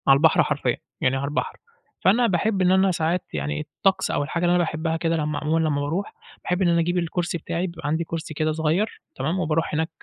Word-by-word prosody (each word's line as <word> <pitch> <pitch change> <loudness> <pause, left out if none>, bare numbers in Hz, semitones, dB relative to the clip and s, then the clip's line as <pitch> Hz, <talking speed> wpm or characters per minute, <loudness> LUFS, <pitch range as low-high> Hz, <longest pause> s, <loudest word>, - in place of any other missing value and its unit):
على 135 0 +7
البحر 160 +2 +5
حرفيًا، - - 0 0.2
يعني 130 +1 +2
على 135 - -2
البحر، 145 +1 -2 0.4
فأنا 235 +5 +4
باحب 195 +1 +1
إن 180 0 +4
أنا 190 0 +4
ساعات 170 +1 0
يعني 75 -1 -2
الطقس 190 +6 0
أو - - 0
الحاجة 170 +5 -3
اللي 175 0 +4
أنا 175 - +3
باحبها 160 0 -2
كده، 165 0 0
لمّا 150 -1 -1
عمومًا 155 +2 +1
لمّا 145 -1 0
باروح 165 +8 -2 0.3
باحب 180 +2 -1
إن 185 - +4
أنا 170 0 +3
أجيب 175 +2 +1
الكرسي 170 0 -1
بتاعي، 170 +3 -3
بيبقى 170 -4 -7
عندي 160 +3 0
كرسي 160 -1 -5
كده 155 +1 0
صغير، 160 +7 0
تمام، 155 +8 -1
وباروح 165 -2 0
هناك 160 +1 0
165 Hz, 220 wpm, -24 LUFS, 155-180 Hz, 0.4 s, على